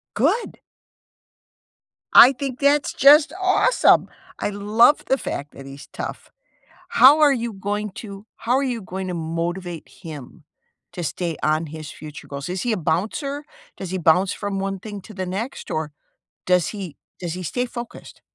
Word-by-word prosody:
Good! 475 - 0 1.5
I 250 - +10
think 265 -2 -5
that's 285 +1 +2
just 295 +3 +6
awesome! 380 +6 +3 0.3
I - - -1
love 210 +8 +3
the 265 - +2
fact 145 - -5
that 135 - -12
he's 140 +1 -10
tough. - - -7 0.6
How 285 +5 +7
are 295 -2 +6
you 235 -3 -2
going 205 +1 -3
to 200 -2 -9
how 230 - -2
are 275 - +1
you 250 -4 -2
going 190 0 -5
to 180 - -3
motivate 170 +1 -4
him 150 -7 -11 0.5
to 175 - -6
stay 170 0 -3
on 155 +2 +1
his 155 0 -8
future 150 -1 -10
goals? 140 +1 -6
Is 180 0 -3
he 240 - 0
a - - 0
bouncer? 220 - -2 0.3
Does 190 - -6
he 185 - -2
bounce 180 +3 +3
from 200 -1 -4
one 195 0 -3
thing 205 +1 -8
to 215 - -12
the 185 -1 -4
next, 210 +9 -5
or, 155 -1 -3 0.5
does 180 -2 +3
he 195 -7 -7 0.2
does 175 -2 -4
he 185 - -6
stay 245 +9 -2
focused? 240 -1 -9
195 Hz, 165 wpm, -22 LUFS, 170-245 Hz, 1.5 s, I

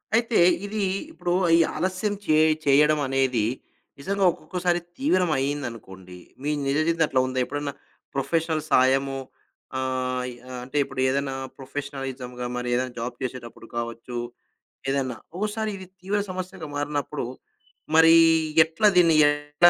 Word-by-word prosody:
అయితే, 230 0 +2 0.3
ఇది 205 0 -2 0.3
ఇప్పుడు, 175 - -2 0.2
ఈ - - +4 0.2
ఆలస్యం 185 +5 -1
చే 155 -2 +4 0.3
చేయడం 150 +2 +5
అనేది, 130 -4 +1 0.6
నిజంగా 195 +6 -1
ఒక్కొక్కోసారి 175 0 -1 0.2
తీవ్రం 185 - +2
అయిందనుకోండి, 115 -10 -5 0.3
మీ 150 - 0 0.2
నిజజివితం 155 +4 +2
అట్లుందా? 130 -1 0
ఎప్పుడన్నా 145 0 -4 0.4
ప్రొఫెషనల్ 160 +2 0
సాయము, 135 0 +3 0.6
ఆహ్, 130 -1 -1
ఈ - - -9 0.3
అంటే, 130 +4 -5
ఇప్పుడేదైనా 135 0 -1 0.2
ప్రొఫెషనలిజంగా 135 -3 -5
మరి 125 0 -3
ఏదైనా 125 0 -1
జాబ్ 120 +1 -5
చేసేటప్పుడు 120 -2 -7
కావచ్చు, 115 +1 -5 0.7
ఏదన్నా 135 -3 -1 0.2
ఒక్కోసారి 215 +2 -2
ఇది 185 -1 -10
తీవ్ర 200 +2 0
సమస్యగా 185 -4 -6
మారినప్పుడు, 145 -1 -2 0.7
మరి 165 0 +8 0.5
ఎట్లా 165 +7 +2
దీన్ని 165 -3 +6
ఎట్లా 145 +3 +4
145 Hz, 115 wpm, -25 LUFS, 130-170 Hz, 0.7 s, మరి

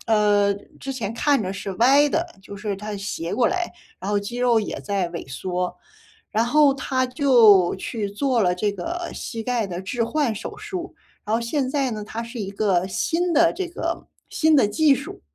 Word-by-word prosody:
呃， 205 -2 +3 0.2
之 270 - -5
前 225 -5 -4
看 280 -2 +2
着 185 - -3
是 195 0 -5
歪 270 +9 +5
的， 335 +2 0 0.2
就 200 - -10
是 205 -1 -3
它 210 +1 -6
斜 195 -4 -4
过 245 - +3
来， 360 -1 -2 0.3
然 - - -6
后 205 - +2
肌 220 +4 -6
肉 245 -2 +3
也 - - -4
在 195 -4 -1
萎 170 -4 -7
缩。 180 +5 -2 0.6
然 225 +2 +2
后 290 +2 +5
他 260 -1 0
就 235 -9 +5
去 205 +1 -4
做 245 +4 0
了 180 -1 +2
这 205 +3 0
个 345 - -4
膝 225 -3 -5
盖 240 -2 0
的 180 0 -5
置 230 +5 -2
换 275 -3 0
手 - - -7
术， 380 -5 -6 0.3
然 215 - 0
后 235 - -2
现 260 +3 -1
在 270 -2 0
呢， 215 -1 -4
它 225 +2 -5
是 235 +1 -8
一 195 - -4
个 195 -3 +1
新 335 - 0
的 330 +2 +5
这 380 - -3
个 335 0 -4 0.2
新 315 -1 +3
的 265 - +5
技 300 +4 +4
术。 310 +10 -7
230 Hz, 215 characters per minute, -23 LUFS, 200-285 Hz, 0.6 s, 歪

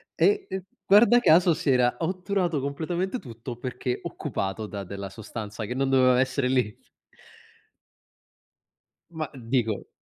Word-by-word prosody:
e, 410 -1 +3
ehm, 190 -1 -4 0.2
guarda 220 +4 +7
caso 175 -3 +5
si 150 - -2
era 125 -2 +3
otturato 180 -3 -1
completamente 170 - -2
tutto 120 0 -8
perché 125 0 -3
occupato 95 +3 -4
da 100 -1 -6
della 100 +1 -6
sostanza 110 +1 -7
che 125 - -4
non 135 0 0
doveva 130 -1 +4
essere 130 0 +1
lì. 125 -5 +1 2.4
Ma 160 -3 -4
dico, 115 -4 -1
130 Hz, 125 wpm, -26 LUFS, 115-170 Hz, 2.4 s, guarda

